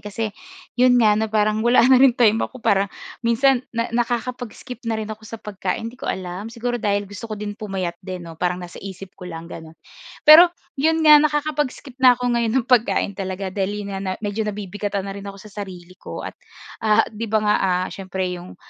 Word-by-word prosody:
Kasi 210 Hz, +1 st, -4 dB, 0.5 s
yun 250 Hz, 0 st, +5 dB
nga, 220 Hz, -3 st, +5 dB
na 220 Hz, -, 0 dB
parang 215 Hz, 0 st, +1 dB
wala 240 Hz, +1 st, +5 dB
na 260 Hz, 0 st, +6 dB
ring 260 Hz, -2 st, +6 dB
time 225 Hz, -2 st, +4 dB
ako 255 Hz, -4 st, -5 dB
para 200 Hz, 0 st, +3 dB, 0.3 s
minsan, 240 Hz, +2 st, +3 dB, 0.2 s
na 230 Hz, 0 st, -1 dB
nakakapag-skip 245 Hz, +1 st, -3 dB
na 225 Hz, -, 0 dB
rin 220 Hz, -, -3 dB
ako 215 Hz, 0 st, -7 dB
sa 225 Hz, -, -6 dB
pagkain. 210 Hz, +1 st, -4 dB
Hindi 245 Hz, +3 st, -10 dB
ko -, -, -5 dB
alam, 185 Hz, +3 st, -4 dB
siguro, 240 Hz, +1 st, -3 dB
dahil 205 Hz, 0 st, 0 dB
gusto 205 Hz, +3 st, -9 dB
ko 215 Hz, -, -3 dB
din 205 Hz, 0 st, -5 dB
pumayat 190 Hz, -5 st, -4 dB
din, 185 Hz, -2 st, -7 dB
'no? 165 Hz, -1 st, -11 dB
Parang 180 Hz, 0 st, +1 dB
nasa 175 Hz, -1 st, -9 dB
isip 195 Hz, 0 st, -9 dB
ko 180 Hz, -2 st, -10 dB
lang 165 Hz, -1 st, -7 dB
ganun, 160 Hz, -1 st, -10 dB, 0.5 s
pero 325 Hz, +4 st, +10 dB, 0.3 s
'yon 320 Hz, +1 st, +2 dB
nga 300 Hz, -1 st, +9 dB
nakakapag-skip 295 Hz, -3 st, -1 dB
na 250 Hz, -2 st, +7 dB
ako 245 Hz, -1 st, -1 dB
ngayon 230 Hz, -2 st, +1 dB
ng 250 Hz, -, +1 dB
pagkain 235 Hz, -4 st, +2 dB
talaga, 190 Hz, -1 st, -4 dB
dali 205 Hz, +1 st, -2 dB
na 195 Hz, -1 st, -5 dB
na 190 Hz, -1 st, -2 dB
medyo 205 Hz, +2 st, -2 dB
nabibigatan 205 Hz, -1 st, -4 dB
na 195 Hz, -, -5 dB
rin 200 Hz, 0 st, -9 dB
ako 195 Hz, -, -8 dB
sa 205 Hz, +1 st, -13 dB
sarili 180 Hz, -2 st, -9 dB
ko -, -, -7 dB
at, -, -, -5 dB, 0.5 s
ah, 215 Hz, -1 st, +4 dB
'di 225 Hz, +1 st, -5 dB
ba? 220 Hz, 0 st, +2 dB
Nga, 210 Hz, -, +3 dB
ah, 185 Hz, -1 st, +1 dB
siyempre, 190 Hz, -1 st, -4 dB
'yong 180 Hz, 0 st, -9 dB
210 Hz, 210 wpm, -22 LUFS, 190-240 Hz, 0.5 s, pero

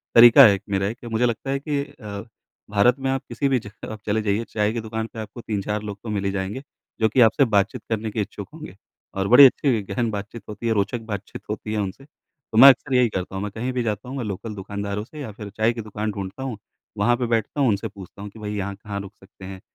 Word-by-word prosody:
तरीका 120 Hz, 0 st, +10 dB
है 105 Hz, -, +7 dB
एक 100 Hz, -, -3 dB
मेरा 95 Hz, 0 st, +1 dB
एक 115 Hz, -, -4 dB
कि 120 Hz, -, -9 dB
मुझे 115 Hz, +1 st, +1 dB
लगता 120 Hz, +3 st, -2 dB
है 135 Hz, -, 0 dB
कि 145 Hz, 0 st, -1 dB
अ, 105 Hz, -7 st, -8 dB, 0.5 s
भारत 115 Hz, +6 st, +3 dB
में 135 Hz, -, -1 dB
आप 135 Hz, -, -1 dB
किसी 120 Hz, +4 st, 0 dB
भी 130 Hz, -, +2 dB
जगह 105 Hz, 0 st, -10 dB
आप 110 Hz, -, -9 dB
चले 110 Hz, +1 st, +1 dB
जाइए 105 Hz, +1 st, 0 dB
चाय 105 Hz, -1 st, +1 dB
की 120 Hz, -, -2 dB
दुकान 110 Hz, 0 st, -4 dB
पे 115 Hz, -, -7 dB
आपको 110 Hz, +2 st, -7 dB
3-4 105 Hz, -1 st, -2 dB
लोग 105 Hz, -1 st, -6 dB
तो 115 Hz, -, -6 dB
मिल 100 Hz, -2 st, -2 dB
ही 100 Hz, -, +1 dB
जाएँगे 100 Hz, +7 st, -4 dB, 0.4 s
जो 110 Hz, -, +3 dB
कि 125 Hz, +4 st, +3 dB
आपसे 120 Hz, +4 st, +5 dB
बातचीत 100 Hz, +1 st, +2 dB
करने 110 Hz, -1 st, -2 dB
के 110 Hz, -, -1 dB
इच्छुक 100 Hz, 0 st, -6 dB
होंगे 155 Hz, -, -10 dB, 0.4 s
और 95 Hz, 0 st, 0 dB
बड़ी 125 Hz, +6 st, +10 dB
अच्छी 130 Hz, -3 st, +3 dB
गहन 100 Hz, +4 st, -1 dB
बातचीत 105 Hz, +3 st, -6 dB
होती 105 Hz, +3 st, -5 dB
है, 115 Hz, -, +3 dB
रोचक 105 Hz, +4 st, 0 dB
बातचीत 105 Hz, -3 st, -6 dB
होती 105 Hz, 0 st, -4 dB
है 110 Hz, -, 0 dB
उनसे। 100 Hz, +6 st, -4 dB
तो 140 Hz, -5 st, -11 dB
मैं 135 Hz, +4 st, +11 dB
अक्सर 135 Hz, 0 st, +2 dB
यही 125 Hz, -2 st, +4 dB
करता 95 Hz, -1 st, -4 dB
हूँ। 95 Hz, -, -3 dB
मैं 105 Hz, -, -4 dB
कहीं 115 Hz, +5 st, -3 dB
भी 125 Hz, -, 0 dB
जाता 105 Hz, +1 st, -3 dB
हूँ 135 Hz, -, -5 dB
मैं 125 Hz, -, -2 dB
लोकल 105 Hz, +2 st, -5 dB
दुकानदारों 100 Hz, +1 st, -4 dB
से 150 Hz, +7 st, -12 dB
या 130 Hz, -, -6 dB
फिर 105 Hz, 0 st, -9 dB
चाय 110 Hz, +2 st, +3 dB
की 115 Hz, -, -5 dB
दुकान 105 Hz, 0 st, -4 dB
ढूँढता 100 Hz, +5 st, -6 dB
हूँ, 130 Hz, -5 st, -4 dB, 0.4 s
वहाँ 120 Hz, +4 st, +3 dB
पे 125 Hz, -, -1 dB
बैठता 115 Hz, +4 st, -1 dB
हूँ, 130 Hz, -, +4 dB
उनसे 105 Hz, +1 st, 0 dB
पूछता 100 Hz, -1 st, -12 dB
हूँ 105 Hz, -, -6 dB
कि 110 Hz, -, -14 dB
भई 105 Hz, -1 st, -4 dB
यहाँ 100 Hz, 0 st, -3 dB
कहाँ 100 Hz, 0 st, -6 dB
रुक 100 Hz, +1 st, -10 dB
सकते 95 Hz, -1 st, -15 dB
हैं? 95 Hz, 0 st, -8 dB
110 Hz, 265 wpm, -23 LUFS, 100-120 Hz, 0.5 s, मैं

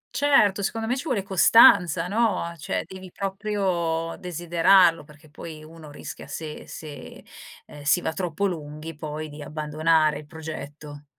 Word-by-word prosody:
Certo, 215 Hz, -9 st, +3 dB
secondo 225 Hz, +3 st, -2 dB
me 245 Hz, +3 st, 0 dB
ci 270 Hz, -, -5 dB
vuole 245 Hz, -10 st, -1 dB
costanza, 180 Hz, -3 st, +5 dB
no, 225 Hz, +2 st, +1 dB
a 170 Hz, 0 st, -6 dB
cioè, 155 Hz, -, -3 dB
devi 185 Hz, 0 st, -11 dB
proprio 190 Hz, -5 st, -2 dB
desiderarlo, 175 Hz, 0 st, +3 dB
perché 150 Hz, +1 st, -18 dB
poi 155 Hz, 0 st, -9 dB
uno 160 Hz, -1 st, -13 dB
rischia 145 Hz, -, -9 dB
se 155 Hz, -2 st, -7 dB
se, 150 Hz, -2 st, -10 dB, 0.4 s
ehm, 150 Hz, -, -12 dB
si 145 Hz, +5 st, +3 dB
va 160 Hz, -, -2 dB
troppo 180 Hz, +1 st, -2 dB
lunghi 155 Hz, -3 st, -5 dB
poi 155 Hz, +1 st, -6 dB
di 150 Hz, 0 st, -10 dB
abbandonare 155 Hz, 0 st, +1 dB
il 150 Hz, -, -13 dB
progetto. 150 Hz, -2 st, -9 dB
165 Hz, 150 wpm, -24 LUFS, 150-190 Hz, 0.4 s, costanza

